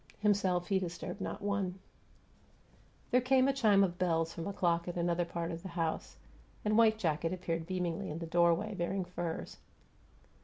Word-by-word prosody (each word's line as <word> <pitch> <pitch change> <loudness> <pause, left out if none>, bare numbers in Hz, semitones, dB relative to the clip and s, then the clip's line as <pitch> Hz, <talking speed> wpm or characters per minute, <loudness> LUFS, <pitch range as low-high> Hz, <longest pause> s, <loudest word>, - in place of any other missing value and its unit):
Himself, 195 -4 +2
he 195 -1 +3
disturbed 180 +2 -5
not - - -4
one. 200 -2 -1 1.3
There 250 0 +5
came 260 +1 +4
a 275 - +3
chime 210 -7 +4
of 180 -1 -1
bells 165 -2 +1
from 165 +2 -5
a - - -2
clock 170 -3 +1
in 175 - -4
another 170 0 +1
part 170 0 -3
of 165 0 -5
the 190 - -7
house, 165 -2 -3 0.5
and 210 0 +2
white 220 -1 +5
jacket 165 -4 0
appeared 165 -3 -3
beamingly 180 0 -2
in 150 - -4
the 165 - -4
doorway, 170 +5 +2
bearing 185 +1 -2
furs. 175 -2 -5
180 Hz, 175 wpm, -33 LUFS, 170-200 Hz, 1.3 s, There